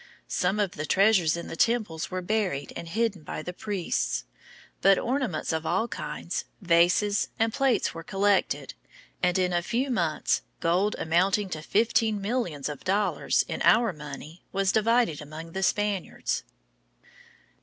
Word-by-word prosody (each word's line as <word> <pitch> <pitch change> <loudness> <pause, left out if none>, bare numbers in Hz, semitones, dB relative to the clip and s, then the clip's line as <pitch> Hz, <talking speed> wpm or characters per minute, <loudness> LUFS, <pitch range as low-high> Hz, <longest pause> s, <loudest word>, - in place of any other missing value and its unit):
Some 190 +4 0
of 200 -3 +1
the 155 0 -5
treasures 190 -5 +4
in 170 - -5
the - - -6
temples 215 -6 0
were 185 0 -4
buried 190 -8 -1
and 170 - -6
hidden 220 -2 0
by 155 - -6
the 180 - -5
priests; 180 - -2 0.6
but 195 0 +6
ornaments 240 - -1
of 160 0 -1
all 225 +7 0
kinds, 180 -5 -4
vases, 180 +3 +3
and 225 0 +1
plate 270 -3 +1
were 165 - -7
collected, 195 +3 +1 0.5
and 180 0 +2
in 180 -1 +1
a 175 - +2
few 250 +9 -1
months 170 -9 +1 0.2
gold 180 +5 +1
amounting 185 +5 +1
to 155 - -4
fifteen 220 +3 +2
millions 195 - -2
of 145 -3 -6
dollars 200 +2 +1
in - - -4
our 230 -3 +4
money 150 +2 -9
was 195 0 +1
divided 220 -7 +2
among 155 +3 -9
the 190 - -4
Spaniards. 205 -1 -1
190 Hz, 150 wpm, -27 LUFS, 165-215 Hz, 0.6 s, but